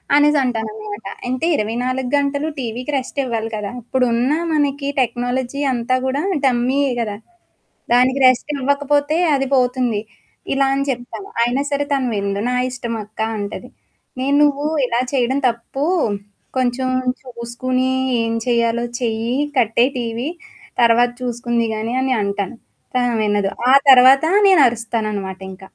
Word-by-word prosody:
అనేసి 295 0 +4
అంటాననమాట. 220 -3 -4 0.2
అంటే, 255 +5 -1
24 250 +4 -2
గంటలు 285 +1 0
టీవీకి 245 +3 -4
రెస్ట్ 265 +2 -7
ఇవ్వాలి 225 -2 -2
కదా! 205 -1 -4
అప్పుడున్న 245 +1 +1 0.2
మనకి 285 -1 0
టెక్నాలజీ 245 +2 -2
అంతా 245 +1 0
కూడా 275 +4 -1 0.2
టమ్మీయే 260 +3 +1
కదా! 210 -2 -3 0.8
దానికి 255 +2 +3
రెస్టివ్వకపోతే 285 +3 +1 0.2
అది 270 -1 -1
పోతుంది. 250 -4 +1 0.5
ఇలా 275 0 +2
అని 275 0 0
చెప్తాను. 250 +10 -5
అయినా 245 +4 +1
సరే 285 0 +1
తను 270 -2 0
విందు. 200 0 -2
"నా - - -1 0.2
ఇష్టమక్క" 230 -4 -6 0.2
అంటది. 205 -1 -5 0.5
నేను 275 +2 +1
నువ్వు 290 0 +1 0.2
ఇలా 240 -1 0
చేయడం 260 +1 +1
తప్పు. 235 +4 -5 0.7
కొంచెం 255 0 0 0.3
చూసుకని, 255 +1 -2 0.3
ఏం 230 0 -1
చేయాలో 235 0 +1 0.2
చెయ్యి, 230 0 -1 0.2
కట్టేయి 240 +2 +3
టీవీ. 235 +4 -3 0.5
తర్వాత 235 +1 +5
చూసుకుంది 240 -1 -1
గాని 220 +2 -3
అని 260 0 +1
అంటాను. 200 +3 -2 0.4
కానీ, 250 -1 +2
ఆమె - - 0
వినదు. 205 -1 +1 0.2
ఆ - - +6 0.2
తర్వాత, 260 +2 +8 0.2
నేనరుస్తాననమాటింక. 215 - 0
245 Hz, 125 wpm, -19 LUFS, 230-270 Hz, 0.8 s, తర్వాత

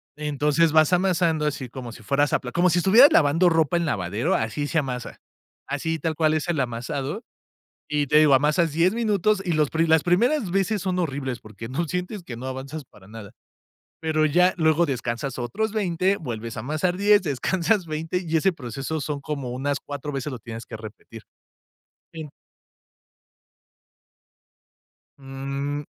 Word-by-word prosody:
Entonces, 150 +2 +1
vas 155 +2 +4
amasando 175 -4 +2
así, 135 -4 -3
como 125 -2 -8
si 115 - -13
fueras 145 +5 +1
a - - +3
pla 125 - -7
como 180 +4 +3
si 175 - +2
estuvieras 225 +10 +7
lavando 165 +4 +4
ropa 165 0 +2
en 170 - 0
lavadero, 100 - -1
así 145 +7 -2
se 160 - +1
amasa. 125 -4 -5 0.5
Así 160 +3 -2
tal 160 -1 -2
cual 155 0 +2
es 155 - -2
el 160 -4 0
amasado, 135 - -3 0.7
y 150 -1 0
te 150 +3 +4
digo, 150 -3 +6
amasas 150 +3 +2
10 175 +6 +2
minutos, 215 -3 +1
y 175 - -1
los 155 -3 +1
pri 165 +1 +1
las 160 -1 +4
primeras 220 - +2
veces 195 +1 0
son 185 -1 -1
horribles 135 -6 -3
porque 110 +1 -10
no 160 +6 -2
sientes 180 +4 -4
que 120 -8 -8
no 130 +2 -7
avanzas 135 +3 -6
para 100 -5 -19
nada. 105 -3 -10 0.7
Pero, 155 -1 +1
ya 180 +5 +3
luego 160 +1 +3
descansas 120 0 -3
otros 165 - -2
20, 190 -1 +1
vuelves 115 -6 -6
a - - -3
amasar 155 +7 -1
10, 205 0 +5
descansas 180 - 0
20, 160 +3 -3
y 160 0 +2
ese 190 +4 +2
proceso 140 +2 -5
son 140 0 -4
como 140 -4 -4
unas 135 +3 -1
4 145 0 -6
veces 135 +1 -4
lo 125 - -6
tienes 115 +1 -8
que 110 - -8
repetir. 110 +1 -11 0.9
Sí. 160 -3 -7 2.9
Mm. 140 +2 -4
150 Hz, 170 wpm, -24 LUFS, 130-175 Hz, 2.9 s, estuvieras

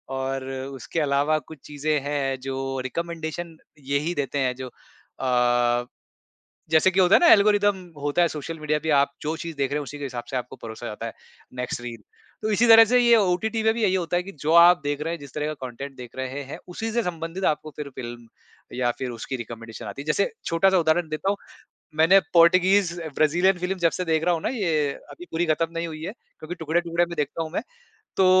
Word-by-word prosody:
और 135 0 -2
उसके 135 +3 -5
अलावा 145 +1 +2
कुछ 155 - -10
चीज़ें 150 +1 0
हैं 140 -2 -1
जो 135 +1 -4 0.3
रिकमेंडेशन 170 +1 -5 0.4
यही 150 +5 +1
देते 140 0 -2
हैं 130 -2 0
जो 130 0 -6 0.5
अ, 120 -1 +2 0.9
जैसे 160 +4 +5
कि 190 +1 +2
होता 180 0 +5
है - - +7
ना, 345 - +5
एल्गोरिदम 205 -1 +4 0.3
होता 145 +4 +2
है 170 - +4
सोशल 160 +1 -6
मीडिया 150 0 0
पे 160 - -1
आप 140 0 +1
जो 155 +2 -2
चीज़ 165 -1 -6
देख 140 -1 0
रहे 150 - +1
हैं - - -3
उसी 145 +1 -8
के 145 - -5
हिसाब 125 -3 -5
से 130 - -3
आपको 125 0 -4
परोसा 115 +1 -7
जाता 110 +1 -5
है 115 - -5 0.4
नेक्स्ट 125 -1 -4
रील। 120 -1 -7 0.4
तो 215 - 0
इसी 210 +4 +3
तरह 225 0 +9
से 250 +3 +3
ये 235 -1 +6
ओटीटी 220 +3 +1
पे 220 0 +4
भी 230 - -3
यही 190 -3 +3
होता 175 -1 0
है 180 - +1
कि 195 - -9
जो 155 +3 0
आप 175 -1 +6
देख 145 0 -1
रहे 165 +2 -2
हैं, 170 - -4
जिस 140 -1 -12
तरह 150 0 -2
का 155 - -2
कंटेंट 135 +3 -8
देख 125 -1 -11
रहे 130 0 -3
हैं, 140 +2 -5
है - - -7
उसी 220 +6 -4
से 235 +1 +1
संबंधित 170 0 -4
आपको 155 +1 -8
फिर 150 -1 -5
फिल्म 120 -1 -8 0.5
या 125 -1 +1
फिर 130 -1 -3
उसकी 120 +3 -5
रिकमेंडेशन 115 -1 -8
आती 140 - -6
है। - - -16
जैसे 155 - +1
छोटा-सा 185 +3 +3
उदाहरण 160 0 +2
देता 155 +5 -1
हूँ, 205 - 0 0.6
मैंने 165 +5 +6
पॉर्टिगीज़ 185 +2 +5 0.2
ब्राज़ीलियन 175 +5 +3
फ़िल्म 185 +2 -2
जब 165 - +5
से - - -2
देख 160 -1 +1
रहा 175 0 +3
हूँ 165 - -2
ना - - 0
ये 165 - 0 0.2
अभी 355 - -11
पूरी 170 +2 0
ख़त्म 160 +1 +1
नहीं 165 0 -2
हुई 155 -1 -8
है 185 - -3 0.3
क्योंकि 160 +3 -6
टुकड़े-टुकड़े 170 +1 0
में 170 0 -7
देखता 150 +3 -1
हूँ 160 - -7
मैं। 180 - -1 0.6
तो 190 - +4
155 Hz, 225 wpm, -24 LUFS, 135-175 Hz, 0.9 s, तरह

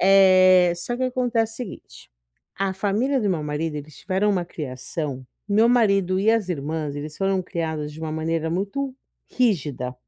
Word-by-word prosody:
Eh, 185 -2 +6
só 240 +8 -4
que 255 - -1
acontece 245 -3 0
o - - -9
seguinte, 245 -6 -9 0.5
a 195 0 0
família 220 +8 0
do 210 - 0
meu 160 -4 -1
marido, 150 +1 -3
eles 150 0 -9
tiveram 200 +2 0
uma 180 -3 0
criação 135 -2 -5 0.2
meu 220 +3 +4
marido 195 -6 +3
e 215 +3 +4
as 225 -4 +1
irmãs, 150 -2 -3
eles 150 +1 -6
foram 195 -1 0
criadas 160 -4 -4
de 155 - -11
uma 160 -1 -4
maneira 160 0 -1
muito 230 +10 -2 0.3
rígida. 145 - 0
185 Hz, 165 wpm, -23 LUFS, 155-210 Hz, 0.5 s, Eh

